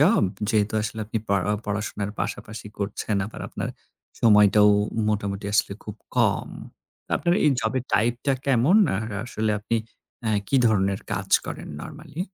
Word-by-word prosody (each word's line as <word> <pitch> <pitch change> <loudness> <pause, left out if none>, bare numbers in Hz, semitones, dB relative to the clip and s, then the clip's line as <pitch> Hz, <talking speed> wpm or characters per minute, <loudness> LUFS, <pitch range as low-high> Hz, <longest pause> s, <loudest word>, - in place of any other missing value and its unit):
Job? - - +5 0.3
যেহেতু 110 -1 +1
আসলে 110 +1 -4
আপনি 110 +1 -2
পড়া 100 -1 +1
অ - - -1
পড়াশোনার 105 0 -2
পাশাপাশি 105 -1 -5
করছেন 105 +1 -2
আবার 110 - -9
আপনার - - -4 0.5
সময়টাও 105 -1 +6 0.4
মোটামুটি 100 -1 -2
আসলে 105 - +2
খুব 105 -1 -7 0.2
কম। - - +2 0.7
আপনার 175 0 +1
এই 150 - +6
জবের 120 +3 -1
টাইপটা 120 +5 +2
কেমন? 135 - +4 0.2
আর 110 +2 -3 0.2
আসলে 110 -2 -1
আপনি 110 +3 -1 0.5
এ - - +2 0.2
কী 135 - +3
ধরনের 100 -3 +2
কাজ - - -3 0.2
করেন - - -6
নরমালি? 160 - -8
110 Hz, 145 wpm, -25 LUFS, 105-115 Hz, 0.7 s, সময়টাও